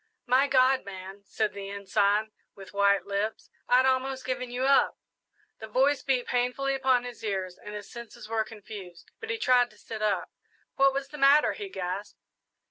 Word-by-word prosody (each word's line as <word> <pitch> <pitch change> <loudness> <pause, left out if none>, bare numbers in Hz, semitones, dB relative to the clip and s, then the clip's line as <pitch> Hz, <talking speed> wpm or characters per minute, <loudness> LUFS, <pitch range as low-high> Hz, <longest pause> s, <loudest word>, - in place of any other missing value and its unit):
"My 260 +3 +4
God, 260 -1 +4
man," 195 0 -9
said 215 +1 -1
the 195 -1 -7
Ensign, 200 +2 +1 0.2
with 195 0 -12
white 200 0 +3
lips, 200 +2 -3 0.2
"I'd 255 +1 +5
almost 265 0 0
given 255 -1 -3
you 245 +1 -3
up!" 275 0 +4 0.6
The 220 - -7
voice 270 +6 +2
beat 255 -3 0
painfully 250 +3 0
upon 260 -2 +2
his 245 -2 -9
ears 190 -4 -2
and 210 0 -7
his 205 -1 -7
senses 235 -2 -10
were 225 0 0
confused, 205 -5 -11
but 450 - -8
he 455 - -1
tried 250 - +3
to 210 - -21
sit 220 +1 -8
up. 205 -4 0 0.4
"What 275 0 +5
was 275 0 -3
the 295 - -9
matter?" 280 +2 +5
he 410 -2 -7
gasped. 190 - -5
235 Hz, 180 wpm, -28 LUFS, 200-265 Hz, 0.6 s, I'd